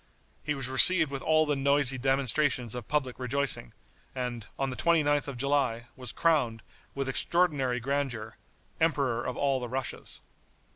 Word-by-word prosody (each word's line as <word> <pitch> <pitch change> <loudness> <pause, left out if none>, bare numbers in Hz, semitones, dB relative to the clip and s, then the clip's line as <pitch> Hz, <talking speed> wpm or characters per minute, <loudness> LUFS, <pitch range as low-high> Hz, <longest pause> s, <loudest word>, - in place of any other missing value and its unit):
He 150 0 -2
was 135 -2 -4
received 155 +4 +7
with 135 -1 -5
all 155 0 +2
the 150 -1 0
noisy 140 -1 +1
demonstrations 135 -2 0
of 125 -3 -7
public 135 -4 -2
rejoicing, 130 - -2 0.4
and, 125 -4 -5
on 135 -1 -2
the - - -6
29th 145 -4 +1
of 140 -3 -6
July, 125 -3 -1
was 125 -3 -7
crowned, 130 -10 0 0.3
with 135 -1 -3
extraordinary 135 -3 +1
grandeur, 125 -4 -3 0.4
Emperor 140 -7 0
of 125 - -5
all 135 -2 0
the 120 -1 -6
Russias. 130 0 -5
135 Hz, 150 wpm, -28 LUFS, 125-145 Hz, 0.4 s, received